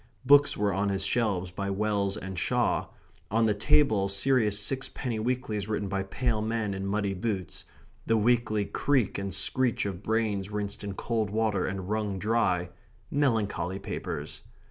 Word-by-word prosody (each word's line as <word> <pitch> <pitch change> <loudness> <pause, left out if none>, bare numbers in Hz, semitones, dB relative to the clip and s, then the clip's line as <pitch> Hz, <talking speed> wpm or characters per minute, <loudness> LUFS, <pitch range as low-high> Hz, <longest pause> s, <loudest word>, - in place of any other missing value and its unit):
Books 145 +2 +6
were 100 -1 +1
on 100 +1 0
his 95 0 +1
shelves 95 -5 0
by 100 +2 -3
Wells 100 0 0
and 95 -2 -5
Shaw; - - +1 0.4
on 115 +2 +3
the 110 - +3
table 105 -2 +3
serious 105 0 +2
six 135 +6 -1
penny 120 -5 -3
weeklies 110 -3 -2
written 105 -2 -1
by 95 0 -1
pale 110 +4 -1
men 110 -2 -1
in 95 0 -4
muddy 100 0 0
boots 95 -2 -3 0.4
the 115 - +3
weekly 110 -2 +2
creak 130 -3 +1
and 100 -1 -3
screech 125 +5 0
of 95 -2 -4
brains 105 -3 0
rinsed 105 -1 -4
in 100 -1 -4
cold 110 -2 -1
water 105 -2 0
and 95 -1 -4
wrung 105 -2 -1
dry 95 -4 +1 0.4
melancholy 105 - 0
papers. 80 -6 -5
105 Hz, 160 wpm, -28 LUFS, 95-115 Hz, 0.4 s, Books